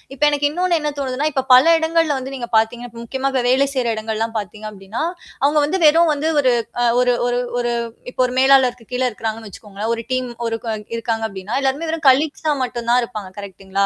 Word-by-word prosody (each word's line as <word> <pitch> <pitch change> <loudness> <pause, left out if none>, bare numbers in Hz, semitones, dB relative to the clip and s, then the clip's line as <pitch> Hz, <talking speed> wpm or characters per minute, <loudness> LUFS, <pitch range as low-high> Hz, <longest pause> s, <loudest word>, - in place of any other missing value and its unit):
இப்ப 280 - -3
எனக்கு 290 0 +1
இன்னொன்னு 350 +2 +1
என்ன 300 -1 -2
தோணுதுனா, 270 +2 -1
இப்ப 265 -2 -1
பல 255 +1 +7
இடங்கள்ல 325 -2 +1
வந்து 265 +1 -7
நீங்க 245 -3 -5
பாத்தீங்க 225 +2 +1 0.2
முக்கியமா 265 +3 -2 0.2
வேலை 265 +3 +3
செய்ற 255 -3 -1
இடங்கள் 220 0 -4
எல்லாம் 225 +1 -2
பாத்தீங்க 210 +2 -8
அப்படினா, 195 +4 -7 0.4
அவங்க 290 +2 +3
வந்து 375 +6 -1
வெறும் 325 +2 +5
வந்து 300 +2 -1
ஒரு 255 -3 +3 0.5
ஒரு 250 0 +3
ஒரு 245 0 0 0.2
ஒரு 240 0 0 0.4
இப்போ 255 - -2
ஒரு 250 - -6
மேலாளருக்கு 260 -3 +4
கீழ 250 +1 0
இருக்கறாங்கன்னு 220 -1 -5
வச்சுக்கோங்களேன். 205 +2 -6
ஒரு 230 - -5
டீம் 255 -1 -1 0.7
இருக்காங்க 225 -1 -2
அப்படின்னா, 195 +2 -7
எல்லாருமே 275 +4 -1
வெறும் 320 -2 -1
கலீக்ஸ் 295 +4 +1
ஆ - - +3
மட்டும் 235 -2 -4
தான் 250 +1 +4
இருப்பாங்க. 215 -5 -7
கரெக்ட் 195 -1 -10
ங்களா? 195 +1 +1
250 Hz, 195 wpm, -19 LUFS, 225-285 Hz, 0.7 s, பல